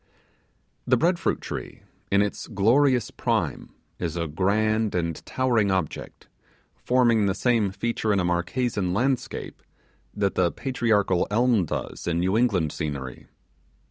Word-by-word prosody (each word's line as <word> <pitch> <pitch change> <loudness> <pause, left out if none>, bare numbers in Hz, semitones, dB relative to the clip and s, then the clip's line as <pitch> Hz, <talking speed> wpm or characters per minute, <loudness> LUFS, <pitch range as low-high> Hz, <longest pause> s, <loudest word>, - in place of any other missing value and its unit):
The 125 - +4
bread 170 +5 +2
fruit - - -1
tree, - - -7 0.3
in 100 +1 +4
its 105 - -4
glorious 125 +3 +2
prime, - - -2 0.3
is 85 -2 -3
a 85 - -1
grand 105 +6 +1
and 85 -2 -2
towering 120 -6 +1
object, 95 -5 -3 0.5
forming 120 -4 +2
the 95 - 0
same 115 -5 +2
feature 110 +2 -1
in 100 - +2
a 90 - 0
Marquesan 90 +2 -1
landscape 130 +4 -2 0.5
that 100 -2 0
the 90 -2 +2
patriarchal 110 -8 +1
elm 115 -2 +2
does - - -5
in 85 -1 0
New 95 +3 +1
England 100 -10 +2
scenery. 70 -5 -5
105 Hz, 135 wpm, -25 LUFS, 90-120 Hz, 0.5 s, The